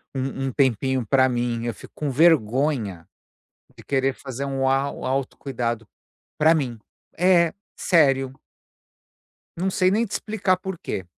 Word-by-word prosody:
um 135 0 -3
um 130 - -2
tempinho 130 -1 +1
pra 130 +1 +4
mim, 120 -1 -1
eu 120 - -2
fico - - -14
com 150 -2 -2
vergonha 130 - +2 0.7
de - - -14
querer 135 -1 0
fazer 135 0 -6
um 135 -1 -1
au 135 0 0
auto 135 0 -2
cuidado, 120 -4 -3 0.5
pra 160 +1 +5
mim. 125 -6 -2 0.4
É, 175 -2 +4 0.2
sério! 135 -6 +2 1.2
Não 190 +2 0
sei 185 0 +2
nem 225 +3 +2
te 205 - -13
explicar 205 -4 0
porquê. 185 - -5
135 Hz, 140 wpm, -23 LUFS, 125-160 Hz, 1.2 s, pra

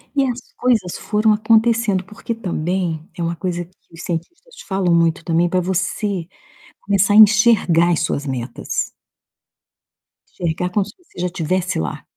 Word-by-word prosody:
E 275 - +3
as 250 -2 -2 0.2
coisas 220 -8 +1
foram 215 0 +2
acontecendo, 220 -2 +2
porque 210 +4 -6
também 175 -5 -2 0.2
é 175 - -4
uma 170 +1 -1
coisa 175 0 -3
que 180 - -27 0.2
os 165 - -10
cientistas 345 - -6
falam 190 -3 +1
muito 165 0 +2
também 170 +1 +1
pra 185 - +1
você 185 0 -2 0.5
começar 200 0 +2
a - - +5
enxergar 210 -5 +6
as 165 - +1
suas 145 -3 -2
metas. 130 -3 -3 1.5
Enxergar 175 +1 -1
como 200 0 +1
se 205 - -12
você 355 - -16
já 180 +1 0
tivesse 185 +1 -1
lá. 80 -3 -4
185 Hz, 155 wpm, -20 LUFS, 170-215 Hz, 1.5 s, enxergar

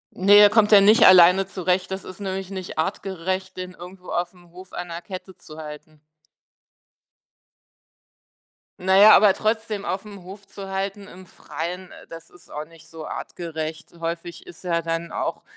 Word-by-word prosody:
Ne, 200 +2 +5
er 205 0 +8
kommt 210 0 +3
ja 200 -1 +8
nicht 215 +3 +6
alleine 185 +1 +7
zurecht. 185 -1 -2
Das 190 0 -5
ist 185 +2 -11
nämlich 190 -1 -5
nicht 185 -4 -7
artgerecht, 185 +2 -3
den 185 0 -7
irgendwo 180 +1 -13
aufm 175 0 -5
Hof 185 +2 -14
an 175 - -6
'ner 170 0 -6
Kette 185 0 -10
zu 155 -1 -14
halten. 150 0 -11 2.8
Na 190 +1 +2
ja, 210 +2 +9
aber 205 -3 +5
trotzdem 215 -2 -2
aufm 200 0 -6
Hof 195 +2 -12
zu 195 0 -10
halten 195 +1 -4
im 185 0 -14
Freien, 180 +2 -7
äh, - - -14
das 165 0 -12
ist 175 - -20
auch 150 +1 -6
nicht 165 0 -18
so 160 -1 -10
artgerecht. 160 -2 -7
Häufig 170 +1 -6
ist 170 - -14
ja 170 -2 0
dann 165 0 -4
auch - - -4
185 Hz, 165 wpm, -23 LUFS, 170-195 Hz, 2.8 s, ja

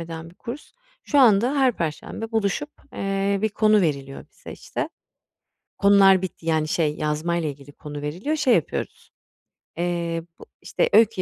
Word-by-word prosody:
eden 165 0 -7
bir - - -21
kurs. 250 +8 -9 0.3
Şu 290 - +1
anda 240 +2 +5
her 260 -2 +4
perşembe 175 +5 -5
buluşup, 225 +7 -1 0.2
eee, 195 0 -1
bir 220 - +3
konu 215 0 +3
veriliyor 140 -5 -2
bize - - -11
işte. - - -5 0.9
Konular 195 -2 +6
bitti 175 -3 -6
yani, 155 -1 +1
şey, 155 -3 0
yazmayla 155 +2 -1
ilgili 140 0 -10
konu 145 0 -8
veriliyor. 185 - -2
Şey 265 -5 +3
yapıyoruz, 165 - -3 0.7
eee, 170 -1 -2 0.2
bu - - -12 0.2
işte, 485 - 0
öykü 225 -4 +5
180 Hz, 150 wpm, -23 LUFS, 160-220 Hz, 0.9 s, Konular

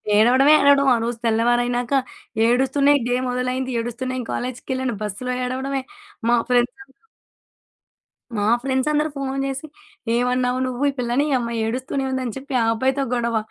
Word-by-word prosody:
ఏడవడమే 255 +7 +5
ఏడవడం. 280 -1 +5
ఆ - - +1
రోజు 235 0 -2
తెల్లవారైనాక 240 +2 +1 0.6
ఏడుస్తునే 270 +4 +3
డే 245 - +1
మొదలైంది. 250 +1 -2
ఏడుస్తునే 255 +2 -4
కాలేజికెళ్ళాను. 255 0 -3
బస్సులో 210 +5 -3
ఏడవడమే. 265 +2 -2 0.5
మా 240 - +5
ఫ్రెండ్సందరూ... 250 +4 -1 1.4
మా 205 - 0 0.2
ఫ్రెండ్సందరూ 295 +3 +1
ఫోను 275 -1 -3
జేసి 270 +3 -4 0.5
"ఏమన్నావు 250 +1 +1
నువ్వు 255 0 -4
ఈ - - -1
పిల్లని 245 +2 +1
ఈ - - -1
అమ్మాయి 235 -1 -3
ఏడుస్తూనే 255 +4 -2
ఉంది" 260 0 -2
అని 235 - -4
చెప్పి 275 +1 -8
ఆ - - +2
అబ్బాయితో 265 +4 0
గొడవ. 235 -1 0
255 Hz, 140 wpm, -22 LUFS, 240-270 Hz, 1.4 s, ఏడవడమే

